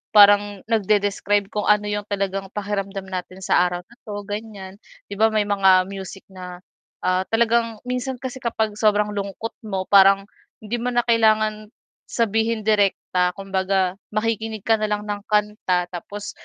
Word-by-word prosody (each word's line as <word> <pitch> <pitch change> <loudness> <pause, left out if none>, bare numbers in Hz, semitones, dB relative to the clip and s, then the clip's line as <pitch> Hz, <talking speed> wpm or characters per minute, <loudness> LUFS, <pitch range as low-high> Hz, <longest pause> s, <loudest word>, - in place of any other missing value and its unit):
parang 205 -1 +6
nagdedescribe 205 -2 +1
kung 210 -1 -2
ano 210 0 +3
yung 205 0 -3
talagang 195 -1 -2
pakiramdam 200 -1 -3
natin 185 0 -7
sa - - +3
araw 175 0 -5
na 235 - -21
'to 205 -1 -5
ganyan. 205 -2 -7 0.3
'Di 200 - -6
ba, 220 - +6
may 215 -1 +1
mga 195 -2 +4
music 195 0 -8
na, 180 -1 -9 0.4
ah, 185 +1 +1
talagang 230 -1 +1
minsan 250 +1 -3
kasi 260 +1 -7
kapag 220 -3 -2
sobrang 210 -1 +2
lungkot 200 +2 -4 0.2
mo 190 -2 -2
parang 195 0 +7 0.4
hindi 230 +3 -3
mo 245 - -3
na 240 -1 +1
kailangan 215 -2 +2 0.4
sabihin 225 0 0
direkta 195 -4 +1
kumbaga, 190 -1 -1 0.2
makikinig 220 -1 -2
ka 225 -1 +2
na 215 - 0
lang 210 0 -2
ng 205 -1 -4
kanta 210 -4 0
tapos 200 +3 -7
205 Hz, 155 wpm, -22 LUFS, 195-220 Hz, 0.4 s, parang